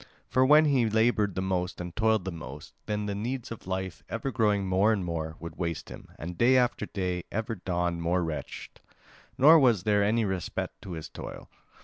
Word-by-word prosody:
For 130 - +4
when 150 +3 +6
he 130 -6 +3
laboured 110 -3 +2
the 95 - -1
most 90 -1 -2
and 90 -1 -6
toiled 110 -4 +2
the 95 - -2
most, 75 -3 -9
then 105 -1 -1
the 100 - -2
needs 120 +5 -4
of 115 - -8
life, 95 -3 -3
ever 115 +4 -3
growing 105 -5 +1
more 95 +3 +3
and 100 -5 0
more, 80 -2 -3
would 85 -1 -8
waste 85 -3 -3
him, - - -10
and 85 +1 -7
day 130 +2 +5
after 120 -4 +1
day 90 -2 -3
ever 110 +1 -2
dawned 90 -3 -2
more 90 +2 +1
wretched, 75 -4 -6 0.6
nor 155 +4 +8
was 120 -9 +3
there 105 -1 +3
any 110 +2 +2
respite 95 -3 -3
to 95 - -7
his 80 -1 -6
toil. - - -9
100 Hz, 200 wpm, -28 LUFS, 90-115 Hz, 0.6 s, nor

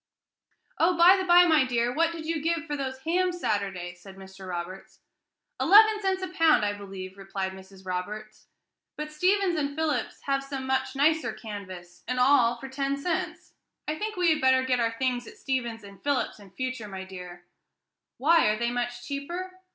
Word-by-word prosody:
"Oh, 340 +1 +3
by 350 +3 +8
the 380 -1 -2
bye, 350 0 +8
my 315 -5 +5
dear, 240 -1 0
what 330 +3 +2
did 330 -2 -7
you 325 -1 -2
give 330 0 -1
for 295 -2 -3
those 265 -2 -4
hams 355 +3 0
Saturday?" 195 - -2
said 190 +2 -14
Mr. 190 0 -11
Roberts. 180 +2 -7 0.6
"Eleven 425 +3 +6
cents 380 -1 0
a - - -2
pound, 330 - +4
I 205 - 0
believe," 195 -1 -9
replied 195 -1 -4
Mrs. 190 0 -14
Roberts; 210 +4 -6 0.5
"but 300 0 -5
Stephens 370 +4 +2
and 285 -1 -2
Philips 315 -1 -2
have 275 -1 0
some 275 -1 -5
much 265 0 -1
nicer, 315 +3 +2
canvas 185 -5 -9
and 250 0 -1
all, 250 -2 +4
for 270 - -8
ten 275 +1 -2
cents. 325 +4 -3 0.3
I 305 - 0
think 430 +6 -4
we 355 -2 +3
had 310 - +1
better 260 0 +4
get 255 -1 +1
our 230 -1 0
things 250 -2 -1
at - - -12
Stephens 240 -4 -3
and 200 -1 -13
Philips's 285 -6 -1
in 200 -2 -14
future, 255 +2 -4
my 190 -1 -6
dear." 180 -2 -10 0.7
"Why? 325 +3 +4
are 215 0 +2
they 235 +1 -1
much 245 0 -3
cheaper?" 345 +7 -5
260 Hz, 185 wpm, -27 LUFS, 200-320 Hz, 0.7 s, by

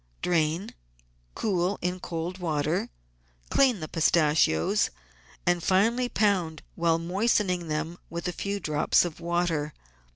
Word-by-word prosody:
Drain, 170 +1 0 0.6
cool 190 -1 0
in 180 +1 -2
cold 170 +2 -4
water, 155 -1 -1 0.6
clean 255 -9 +3
the 155 - -4
pistachios, 155 - +2 0.6
and 175 0 +2
finely 230 +8 +2
pound 180 -9 +1
while 165 -1 +2
moistening 180 0 0
them 160 +3 -3
with 170 +2 -4
a - - 0
few 200 +3 -3
drops 155 0 +2
of 170 -2 -6
water. 170 -3 -1
175 Hz, 120 wpm, -27 LUFS, 160-185 Hz, 0.6 s, clean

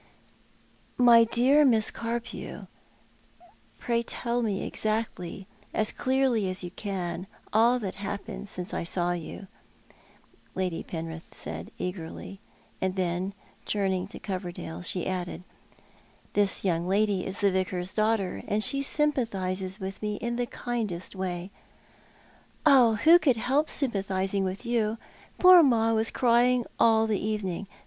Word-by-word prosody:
" - - -34
My 230 0 +8
dear 260 +6 +4
Miss 225 -6 +3
Carpew, 230 +1 -5 1.1
pray 235 -1 0
tell 235 +1 -2
me 205 -4 -1
exactly, 215 -4 -2 0.3
as 215 -1 +2
clearly 255 -6 +1
as 185 0 -1
you 175 - -6
can, 185 -2 -4 0.3
all 230 +3 +5
that 200 -6 -4
happened 200 0 -5
since 180 -1 -6
I - - -2
saw 175 +1 0
yon," 175 +3 -6 1.1
Lady 185 -3 -2
Penrith 165 0 -6
said - - -6
eagerly; 180 +1 -6 0.4
and 190 0 0
then 185 +1 -2 0.3
turning 190 -2 0
to - - -9
Coverdale 180 -4 -5
she 180 0 -2
added, 180 -1 -4 0.5
" - - -31
This 205 -2 +2
yonng 170 -1 0
lady 200 -1 +2
is 190 - -2
the 200 -1 +4
Vicar's 185 -1 0
daughter, 215 -3 0
and 215 +1 +1
she 275 +4 +1
symjpathises 200 -10 0
with 190 0 -6
me 210 -1 -2
in 235 +2 -3
the 245 0 -1
kindest 215 -9 -4
way." 185 0 -4 0.7
" - - -8
Who 270 +4 +6
could 270 -8 +2
help 275 +7 +1
sympathising 195 -6 0
with 190 +5 -4
you? 230 -2 0 0.4
Poor 365 -1 +9
Ma 225 -6 +3
was 220 0 +1
crying 245 0 +3
all 225 -1 +5
the 215 -3 -1
evening. 205 -3 -2
205 Hz, 135 wpm, -27 LUFS, 185-235 Hz, 1.1 s, Poor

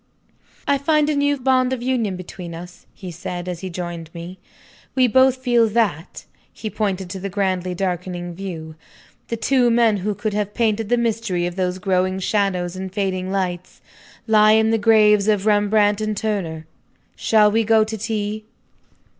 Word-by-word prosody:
"I 280 -1 +2
find 305 +1 +2
a - - -1
new 285 0 +1
bond 255 0 +2
of 245 -2 -4
union 240 -7 0
between 180 -1 -8
us," 175 +1 -11
he 185 -3 -9
said, 175 +1 -6
as 180 -2 -4
he 190 - -6
joined 170 -2 -6
me. 175 +2 -8 0.6
"We 260 -1 +4
both 260 +2 +4
feel 240 -3 +3
that." 205 -7 -1 0.3
He 215 - -6
pointed 195 -3 -2
to 190 - -5
the 195 +1 -4
grandly 185 -2 -1
darkening 175 -1 -3
view. 165 -4 -7 0.5
"The 230 - -3
two 245 +2 +2
men 230 -2 +3
who 205 +2 -2
could 215 +2 -3
have 205 0 -2
painted 225 -2 0
the 245 - +3
mystery 225 -6 -1
of 175 0 -4
those 185 -1 -1
growing 185 0 0
shadows 190 -2 -1
and 190 0 -6
fading 190 -2 -2
lights, 180 -2 -3 0.5
lie 215 -1 +5
in 220 0 +3
the 225 - +2
graves 210 -1 +4
of 210 -2 +2
Rembrandt 210 0 +3
and 215 -1 -2
Turner. 175 -8 -3 0.5
Shall 210 -2 +3
we 225 +2 +2
go 220 0 +4
to 220 +1 -5
tea?" 215 0 -3
205 Hz, 170 wpm, -21 LUFS, 185-225 Hz, 0.6 s, lie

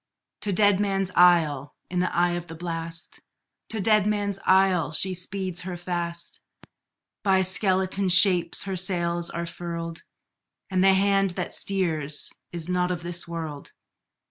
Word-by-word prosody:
To 205 - -2
Deadman's 195 -1 +2
Isle, 160 -6 +3 0.2
in 180 - 0
the 180 - 0
eye 175 0 +3
of 175 0 -4
the 165 - -9
blast, 165 0 -4 0.5
To 220 - -4
Deadman's 205 -1 +1
Isle, 190 -4 +3
she 190 +4 0
speeds 185 0 -4
her 180 0 -6
fast; 170 -1 -3 0.8
By 190 -2 +3
skeleton 190 0 +1
shapes 180 -2 +5
her 195 -1 -4
sails 175 -2 -1
are 170 0 -4
furled, 170 -1 -6 0.7
And 185 0 +2
the 195 0 +6
hand 195 0 +2
that - - -3
steers 160 -7 0 0.2
is 170 -1 -5
not 180 0 0
of 175 -2 -3
this 175 0 -4
world! 160 -4 -6
180 Hz, 140 wpm, -25 LUFS, 170-190 Hz, 0.8 s, the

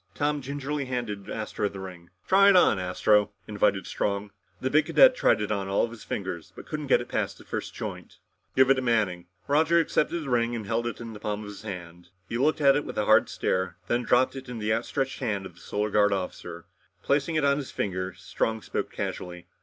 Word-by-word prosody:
Tom 145 0 0
gingerly 140 +1 -3
handed 120 -6 -4
Astro 105 -1 -2
the 100 - -9
ring. 90 -2 -9 0.2
"Try 195 +1 +6
it 200 - +6
on, 145 - +5
Astro," 100 +3 +2 0.2
invited 100 -2 +1
Strong. 100 0 -2 0.3
The 130 - -2
big 155 +1 +3
cadet 255 +10 +7
tried - - +3
it 105 - -2
on 100 -2 -1
all 95 - +2
of 115 - -10
his 115 - -10
fingers 90 -4 -5
but - - -10
couldn't 150 -2 -5
get - - +4
it - - -7
past - - -2
the - - -14
first - - -5
joint. - - -7 0.4
"Give 130 0 +5
it - - +9
to 130 - -2
Manning." 105 -8 0 0.2
Roger 160 +4 +3
accepted 165 +1 +1
the 145 - -6
ring 120 -1 +1
and 110 -3 -5
held 115 +3 -1
it 120 - -5
in 115 -1 -7
the 105 - -9
palm 105 0 -3
of 105 - -8
his 100 - -9
hand. 90 -4 -8 0.2
He 115 - -3
looked 150 +3 +2
at 140 -1 +6
it 145 - +1
with - - -7
a - - +1
hard - - +5
stare, 95 -1 -1
then 120 +4 +1
dropped 125 +2 +2
it 130 -1 -8
in 125 - -5
the 110 0 0
outstretched 135 +4 -2
hand 105 -7 -2
of 90 - -9
the 85 - -19
Solar 105 +1 -2
Guard 105 -1 +4
officer. 90 -2 -5 0.4
Replacing 145 +3 +1
it 155 -2 +2
on 140 0 +3
his 140 -3 -5
finger, 95 -1 -3
Strong 110 +4 -2
spoke - - -3
casually. 90 -1 -5
110 Hz, 230 wpm, -27 LUFS, 100-135 Hz, 0.4 s, it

